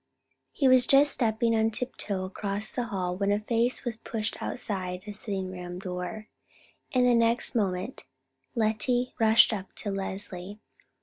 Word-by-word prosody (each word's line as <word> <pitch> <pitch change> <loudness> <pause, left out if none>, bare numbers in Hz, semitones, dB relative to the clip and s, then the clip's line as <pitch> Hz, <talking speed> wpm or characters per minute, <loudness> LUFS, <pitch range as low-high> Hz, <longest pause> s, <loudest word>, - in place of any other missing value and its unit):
He 275 - +2
was 255 -1 +5
just 280 +1 +6
stepping 230 -1 +2
on 220 0 +3
tiptoe 215 -5 -2
across 200 +2 -3
the 245 - -2
hall 185 -5 -2
when 200 +1 0
a 205 - +2
face 235 +4 0
was 235 -3 -2
pushed 225 -1 -4
outside 185 -6 -3
a 210 - -6
sitting 195 -3 -4
room 180 -1 -7
door, 185 +3 -5 0.6
and 250 -1 +3
the 245 - +5
next 230 0 +2
moment 195 +1 -2 0.5
Lettie 235 +3 +1
rushed 225 0 +6
up 195 -3 -6
to 205 - -3
Leslie. 195 0 -5
215 Hz, 150 wpm, -28 LUFS, 190-235 Hz, 0.6 s, just